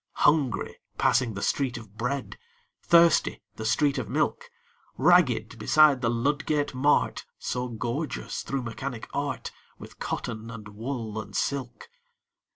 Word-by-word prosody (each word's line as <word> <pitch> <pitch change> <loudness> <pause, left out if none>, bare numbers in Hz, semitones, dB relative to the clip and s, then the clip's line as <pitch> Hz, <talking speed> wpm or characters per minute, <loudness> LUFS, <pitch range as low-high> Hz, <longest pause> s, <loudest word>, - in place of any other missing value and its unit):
Hungry 145 -6 +2 0.2
passing 125 -4 +2
the 100 - -4
Street 130 -4 0
of 110 -3 -12
Bread; 125 +4 -3 0.4
Thirsty 170 -1 +4
the 110 - -5
street 140 +4 +2
of - - -5
Milk; - - -1 0.5
Ragged 140 -8 +3
beside 150 -4 +5
the 115 - +2
Ludgate 145 +5 0
Mart, 140 +3 +2
So 125 0 -3
gorgeous, 120 +6 -3
through 135 -2 -3
Mechanic 120 +1 -5
Art, - - -3 0.3
With - - -13
cotton, 115 0 -4
and 110 -2 -8
wool, 110 0 -4
and - - -12
silk! 135 - -2
125 Hz, 130 wpm, -27 LUFS, 115-145 Hz, 0.5 s, beside